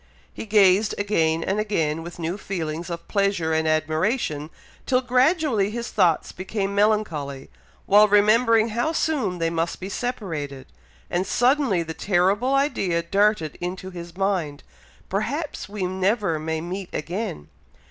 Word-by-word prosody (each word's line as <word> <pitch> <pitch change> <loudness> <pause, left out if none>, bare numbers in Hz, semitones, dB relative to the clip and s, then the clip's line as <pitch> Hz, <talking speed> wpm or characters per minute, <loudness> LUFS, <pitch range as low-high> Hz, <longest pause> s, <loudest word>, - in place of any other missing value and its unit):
He - - -7
gazed 205 0 +4
again 165 -6 +1
and 195 +2 -1
again, 165 -7 0
with 170 +1 -9
new 170 +1 -3
feelings 170 -3 -4
of 170 -1 -6
pleasure 195 -6 0
and 160 0 +1
admiration, 155 - 0 0.4
till 255 -1 +3
gradually 255 - +2
his 235 +2 -5
thoughts 175 -6 +2
became 195 +1 -3
melancholy, 185 - 0 0.3
while 210 +2 +6
remembering 220 +2 +4
how 240 +9 -1
soon 270 - 0
they 165 -1 0
must 165 0 -2
be 185 - -6
separated; 160 - -4 0.5
and 180 +2 0
suddenly 250 - +2
the 160 0 -6
terrible 200 +9 +1
idea 195 - +1
darted 195 -3 +1
into 185 +1 -5
his 175 0 -9
mind, 180 -7 -1 0.4
"Perhaps 275 - -3
we 205 -2 -4
never 190 -2 0
may 160 0 -3
meet 180 +2 -5
again!" 170 - -4
190 Hz, 135 wpm, -24 LUFS, 165-215 Hz, 0.5 s, while